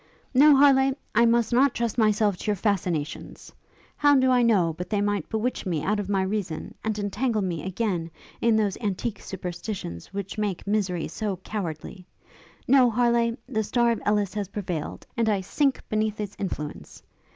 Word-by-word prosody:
'No, 285 +3 +7
Harleigh; 270 -1 +5 0.2
I 235 +2 +5
must 235 0 +2
not 265 +2 +4
trust 235 -2 -1
myself 215 -2 +3
to - - -8
your 210 - +2
fascinations! 180 -7 -2 0.5
How 290 -1 +5
do 260 -1 +4
I 250 -1 +4
know 195 -9 +3
but 180 +2 -6
they 210 - 0
might 205 0 -1
bewitch 225 +3 -2
me 165 -5 -1
out 210 +1 0
of 200 -1 -4
my 195 -2 +1
reason, 190 -5 -3
and 220 -1 -1
entangle 210 +2 -1
me, 170 -5 -3
again, 185 -3 -2 0.3
in 230 -1 +3
those 210 -3 0
antique 210 +1 -3
superstitions 180 - -6
which 200 +1 -5
make 205 -4 -2
misery 195 -5 0
so 205 +3 -3
cowardly? 180 -2 -6 0.6
No, 255 -1 +6
Harleigh! 235 0 +2
the 220 -4 -1
star 235 +2 +2
of 230 - -2
Ellis 205 -2 +1
has 205 -2 -3
prevailed, 180 -6 -5
and 230 -2 +1
I 200 -2 +1
sink 275 +8 0
beneath 215 0 -1
its 210 -1 -4
influence. 150 -6 -6
210 Hz, 175 wpm, -25 LUFS, 190-235 Hz, 0.6 s, No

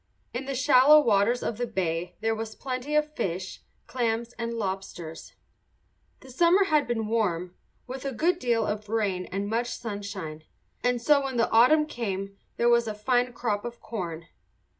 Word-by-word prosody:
In 255 +3 -4
the 275 0 -3
shallow 260 +4 +7
waters 235 -2 +2
of 230 - -3
the 245 - -1
bay 180 -4 -2
there 225 0 +1
was 220 0 -5
plenty 265 +2 -4
of 300 0 +1
fish, 185 -3 -3 0.2
clams, 235 -1 -2
and 235 0 -4
lobsters. 190 -6 -5 0.9
The 260 - -13
summer 345 +8 +4
had 305 -6 +2
been 230 -2 -1
warm, 180 -6 -1 0.3
with 255 +1 -7
a 275 - -2
good 335 +9 +1
deal 235 -5 +1
of 210 0 -4
rain 200 -5 -1
and 200 +1 -3
much 230 +3 0
sunshine; 200 -8 -6 0.4
and 245 0 +2
so 280 +3 +4
when 265 -2 -3
the 230 - +2
autumn 255 +7 +6
came 200 -8 -4 0.2
there 235 - +2
was 235 -1 +4
a 215 - -3
fine 245 +3 +1
crop 210 -4 -2
of 240 0 -7
corn. 170 -7 -5
230 Hz, 170 wpm, -27 LUFS, 200-255 Hz, 0.9 s, shallow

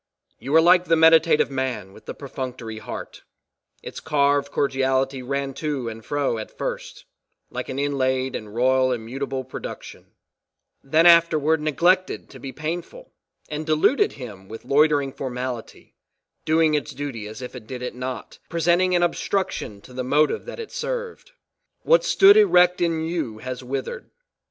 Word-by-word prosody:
You 135 +6 -2
are 160 - +8
like 180 +1 +5
the 165 - +3
meditative 160 -2 +5
man 130 -8 -3
with 110 - -17
the - - -6
perfunctory 125 -5 -6
heart; - - -8 0.6
its - - -7
carved 145 -2 +1
cordiality 135 -1 0
ran 140 +1 -3
to 145 -6 -2
and 115 0 -9
fro 140 -3 -1
at 110 - -9
first, - - -5 0.5
like - - -5
an 130 - -4
inlaid 130 -2 0
and 110 - -6
royl 130 +3 +2
immutable 130 +3 -5
production; 130 - -9 0.7
then 155 +5 +3
afterward 160 -2 +5
"neglected 175 +5 +1
to 130 - -12
be 135 +1 -7
painful" 170 - -6 0.3
and 150 +1 -5
"deluded 155 - +2
him 105 -8 -10
with 110 +3 -10
loitering 145 0 +3
formality, 125 -3 -6 0.5
doing 160 0 +3
its 150 -2 -2
duty 130 -7 -5
as 110 +4 -9
if 125 - -8
it 115 -4 -10
did 125 0 -6
it 125 - -4
not," 125 -1 -6
presenting 175 +2 +2
an 175 - +3
obstruction 175 - -2
to 125 - -15
the 130 0 -3
motive 145 +4 +1
that - - -8
it 455 - -7
served. 485 0 -5 0.5
What - - +4
stood 405 -4 +6
erect 180 - +5
in 165 -2 +1
you, 160 -10 -3
has 130 +2 -6
withered. 135 - -5
140 Hz, 155 wpm, -23 LUFS, 130-165 Hz, 0.7 s, are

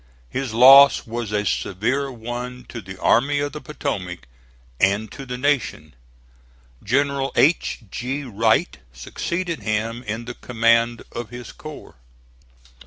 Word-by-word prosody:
His 135 -3 -3
loss 135 +4 +8
was 115 -2 -4
a 105 0 0
severe 125 +9 -1
one 125 +1 -6
to 120 - -7
the 95 -1 -10
Army 140 +5 +3
of 145 0 -2
the 150 +1 -8
Potomac 95 - -5 0.5
and 100 +2 +2
to 135 - -9
the 125 0 -4
Nation. 125 - -1 0.9
General 135 +3 0
H. 155 -1 +2
G. 135 +4 -3
Wright 115 - +1
succeeded 170 - -4
him 115 +2 -2
in 115 0 -5
the 120 - -6
command 115 -1 +1
of 120 -3 -6
his 120 +1 -9
corps. 155 - -11
120 Hz, 130 wpm, -22 LUFS, 110-140 Hz, 0.9 s, loss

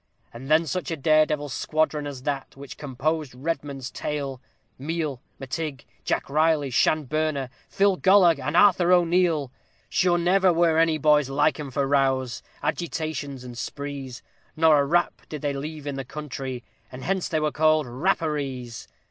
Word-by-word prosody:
And 130 +4 -9
then 160 +2 +4
such 180 +5 -3
a 165 - -3
dare 155 +2 +4
devil 150 -1 -2
squadron 150 +2 -1
as 135 -3 -7
that 140 -1 -4
which 140 0 -9
composed 145 +1 -3
REDMOND'S 140 -2 -4
tail! 140 -3 -4 0.4
Meel, 150 -2 -3 0.2
Mactigh, 135 0 -5 0.2
Jack - - -1
Reilly, 150 -1 +2
Shan 155 +5 +2
Bernagh, 155 -2 -1 0.2
Phil 195 -1 +2
Galloge, 185 -6 +5
and 150 +5 -1
Arthur 180 -3 +5
O'Neal; 170 -5 +3 0.4
Shure 175 -1 +2
never 185 +2 +3
were 165 -1 +3
any 165 -1 +3
boys 150 -2 +3
like 145 +2 +1
'em 145 -2 -5
for 140 +2 -1
rows, 135 -4 +1 0.2
agitations, 155 -5 -3
and 125 -1 -9
sprees, 140 -1 -6 0.3
Not 160 0 +4
a 145 -2 +5
rap 175 +5 +1
did 150 -2 -7
they 145 -1 0
leave 150 +2 -6
in 140 -1 -4
the 135 - -3
country, 135 -3 -6 0.3
and 130 0 -9
hence 190 0 -1
they 160 - 0
were 155 0 0
called 155 0 +3
_Rap_parees. 135 -4 -2
150 Hz, 160 wpm, -25 LUFS, 135-160 Hz, 0.4 s, Galloge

